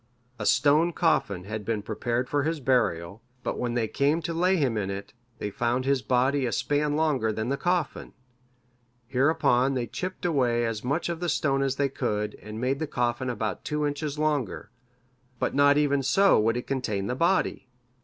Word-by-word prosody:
A 105 - -1
stone 150 +6 +4
coffin 100 - +1
had 105 +2 -5
been 105 -1 -2
prepared 120 +3 -2
for 145 +2 0
his 160 +2 -1
burial, 105 - 0 0.2
but - - -3
when 120 -1 -2
they 115 -2 +1
came 145 +7 +1
to 170 - -2
lay 180 +3 +2
him 135 -9 +1
in 100 -3 -2
it, 100 +1 -6 0.2
they 105 - -4
found 120 +4 -1
his 135 -1 +2
body 130 +1 +1
a - - -2
span 145 +5 0
longer 150 -8 +1
than 110 +2 -3
the 140 - +1
coffin. 175 0 -2 0.9
Hereupon 130 0 +2
they 125 -2 -1
chipped 185 +7 -5
away 125 -8 +2
as 110 -2 -3
much 140 +7 -1
of 170 -1 -3
the 175 0 -1
stone 135 -4 +1
as 135 -1 0
they 140 0 +1
could, 105 -5 -2
and 105 +1 -7
made 130 +3 0
the 160 - -2
coffin 120 0 -1
about 110 -3 -3
two 150 0 -1
inches 145 0 -3
longer; 150 -9 -1 0.7
but - - -1
not 145 +1 +5
even 140 -2 +2
so 195 - +4
would 115 +2 +2
it 125 - -4
contain 110 -8 -2
the 125 - -1
body. 170 -2 +1
130 Hz, 190 wpm, -27 LUFS, 115-150 Hz, 0.9 s, not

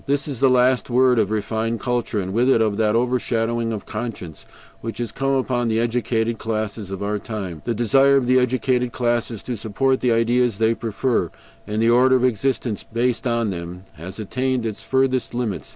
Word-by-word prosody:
This 140 +1 0
is 135 -5 -5
the 135 - +4
last 125 0 +3
word 125 0 +4
of 105 -3 +1
refined 110 +2 -2
culture, 120 -4 -1
and 95 -1 -4
with 120 +4 +2
it, 130 - +4
of 110 -2 +1
that 110 -1 +2
overshadowing 115 -1 0
of 105 -3 -5
conscience 105 -8 -6 0.3
which 115 0 -6
has 120 -3 -3
come 135 +2 -1
upon 125 -2 0
the 110 0 +1
educated 115 -1 0
classes 110 -2 -3
of 95 0 -5
our 105 +1 -1
times. 100 -7 -6
The 120 - -1
desire 135 +5 +4
of 135 - +1
the 130 +1 +4
educated 125 0 0
classes 120 -3 -1
to 125 - -4
support 115 +5 0
the 125 - +2
ideas 115 -1 +2
they 110 +1 +2
prefer, 115 -4 -1 0.4
and 110 +1 -1
the 115 - +4
order 130 +2 +5
of 125 - +1
existence 120 -2 -1
based 120 +2 -1
on 115 -3 0
them, 90 +1 -7
has 90 +4 -9
attained 125 +3 -2
its 110 -2 -4
furthest 130 -2 0
limits. 105 - -3
115 Hz, 195 wpm, -22 LUFS, 110-125 Hz, 0.4 s, order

